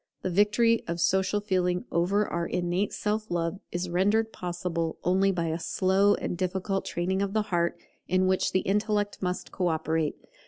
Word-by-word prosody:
The 185 - -1
victory 210 +5 +3
of 170 0 -3
Social 190 +3 +2
Feeling 180 -3 0
over 195 +5 +2
our 170 0 -2
innate 180 +3 -1
Self 215 +1 -2
love 170 +2 -1
is 175 +1 -2
rendered 205 +6 +1
possible 175 -2 -3
only 190 +2 +3
by 170 -3 -1
a 160 +1 -2
slow 195 +4 +3
and - - -3
difficult 190 +2 -2
training 190 +3 -1
of 200 0 -1
the 215 -1 +2
heart, 170 0 +1 0.3
in 185 +1 +2
which 185 0 +2
the 185 - +2
intellect 205 0 0
must 180 -1 -3
co 180 - -1
operate. 160 -1 0
185 Hz, 170 wpm, -27 LUFS, 175-205 Hz, 0.3 s, victory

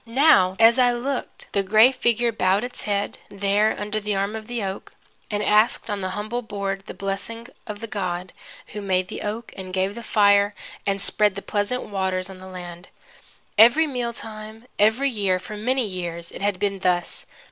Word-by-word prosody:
Now 230 -7 +4
as 230 +3 +6
I 245 -1 +5
looked, 255 +2 -3
the 200 - +2
gray 215 +6 +6
figure 240 -2 +1
bowed 195 -1 +2
its 245 0 -6
head, 200 0 -1
there, 200 +2 +1
under 210 +1 -2
the 210 -1 -2
arm 200 +2 -1
of 220 -1 -7
the 240 -3 -3
oak, 190 0 -5 0.4
and 210 -1 -1
asked 215 +1 +3
on 205 -1 -2
the 185 - -2
humble 215 +4 -3
board 200 -3 -4
the - - -7
blessing 200 +4 -4 0.2
of 210 -1 -6
the - - -4
God 180 -3 -3 0.4
who 210 - -5
made 185 -2 0
the - - -6
oak, 215 +2 -5
and 185 -1 -7
gave 190 +1 0
the 235 - -7
fire 205 -2 +4 0.3
and 200 0 +1
spread 205 0 +1
the 200 - -6
pleasant 210 +5 -1
waters 190 -1 -2
on 185 - -11
the 185 - -10
land. 175 -1 -9 0.7
Every 240 +9 +7
mealtime, 225 -4 -5
every 225 +7 +3
year, 200 -5 +1
for 210 +3 -8
many 250 +4 0
years, 175 -3 -5
it - - -9
had 200 -1 0
been 200 0 -1
thus. 180 -1 -1
205 Hz, 190 wpm, -23 LUFS, 195-225 Hz, 0.7 s, Every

